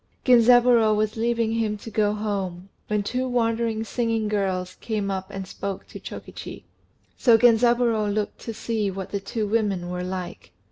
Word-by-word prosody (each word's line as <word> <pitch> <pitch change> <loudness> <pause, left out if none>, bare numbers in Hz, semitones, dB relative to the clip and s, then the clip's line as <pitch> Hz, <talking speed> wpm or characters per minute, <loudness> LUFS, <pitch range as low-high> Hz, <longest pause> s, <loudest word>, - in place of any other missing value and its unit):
Genzaburô 240 -2 +6
was 215 0 0
leaving 230 0 0
him 220 -2 -1
to 225 +2 -10
go 210 -1 +2
home, 195 -3 -3 0.2
when 210 -1 0
two 250 +5 -2
wandering 230 -2 0
singing 225 -1 -1
girls 190 -3 -1
came 210 -3 -2
up 190 0 -4
and 195 -1 -6
spoke 195 +1 -5
to - - -10
Chokichi; - - -9 0.6
so 235 -3 +6
Genzaburô 235 -2 +3
looked 210 0 -2
to 230 - -6
see 220 -2 -2
what 190 -1 -6
the 200 - -1
two 210 +2 -3
women 200 -5 0
were 180 0 -3
like. 180 -1 -6
215 Hz, 160 wpm, -24 LUFS, 195-230 Hz, 0.6 s, Genzaburô